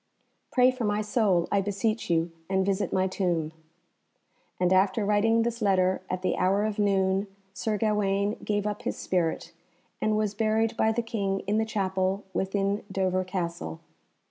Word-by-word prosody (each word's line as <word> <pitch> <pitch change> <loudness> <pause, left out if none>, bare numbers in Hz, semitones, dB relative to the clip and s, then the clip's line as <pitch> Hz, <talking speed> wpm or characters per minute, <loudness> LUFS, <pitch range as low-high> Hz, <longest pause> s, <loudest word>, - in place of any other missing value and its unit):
Pray 250 0 +5
for 255 -1 -5
my 205 -1 +1
soul, 210 -6 +2
I 200 - +3
beseech 205 +2 -1
you, 165 0 +1 0.2
and 190 0 +1
visit 200 +1 0
my 185 0 +2
tomb." 175 -5 -1 1.1
And 180 0 +3
after 195 +3 +3
writing 225 +2 +3
this 235 0 -3
letter, 190 -2 +2
at 185 0 -3
the - - 0
hour 195 +3 +2
of 215 -1 -3
noon, 195 -1 +2 0.3
Sir 210 +2 -1
Gawaine 205 -1 +1
gave 205 -1 -1
up 210 0 -2
his - - -3
spirit, 175 -3 -1 0.5
and 215 0 +2
was 210 -1 0
buried 220 +1 +1
by 220 - +2
the 235 +1 -1
King 200 -4 -2
in 205 +3 0
the 220 - +1
chapel 190 -2 -1
within 195 +1 -1
Dover 185 -1 0
Castle. 170 - -4
200 Hz, 165 wpm, -27 LUFS, 185-215 Hz, 1.1 s, Pray